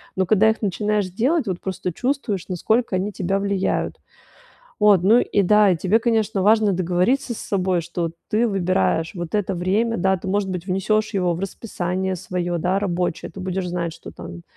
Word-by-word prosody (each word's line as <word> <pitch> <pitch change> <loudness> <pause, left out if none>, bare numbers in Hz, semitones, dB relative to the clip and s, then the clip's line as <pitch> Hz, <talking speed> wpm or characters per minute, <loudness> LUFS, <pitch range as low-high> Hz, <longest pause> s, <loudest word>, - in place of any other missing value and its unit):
Но 190 - +1
когда 215 +2 +4
их 220 - -1
начинаешь 210 0 0
делать, 260 - 0
вот 180 -2 -2
просто 185 -1 -3
чувствуешь, 245 - -2
насколько 210 +4 0
они 195 +3 -1
тебя 195 +1 -1
влияют. 200 -1 -1 0.8
Вот, 205 -4 +5
ну 225 +6 +5
и 200 - +1
да, 210 -1 +5
тебе, 190 +6 +2
конечно, 220 -4 +1
важно 215 -1 +4
договориться 185 +9 +1
с - - -8
собой, 185 -3 0
что 170 0 -3 0.2
ты 225 +3 +2
выбираешь 170 - 0
вот 175 +1 -6
это 200 -2 0
время, 205 +6 0
да, 190 +1 +1
ты, 190 - -6
может 195 0 0
быть, 180 -1 -5
внесёшь 215 +3 0
его 180 -3 +1
в 170 - -6
расписание 190 -2 -3
своё, 175 -1 -3
да, 180 +4 +1
рабочее. 180 -5 -2
Ты 195 - -9
будешь 185 0 -3
знать, 170 -2 -3
что - - -11
там, 85 0 -9
190 Hz, 180 wpm, -22 LUFS, 180-210 Hz, 0.8 s, Вот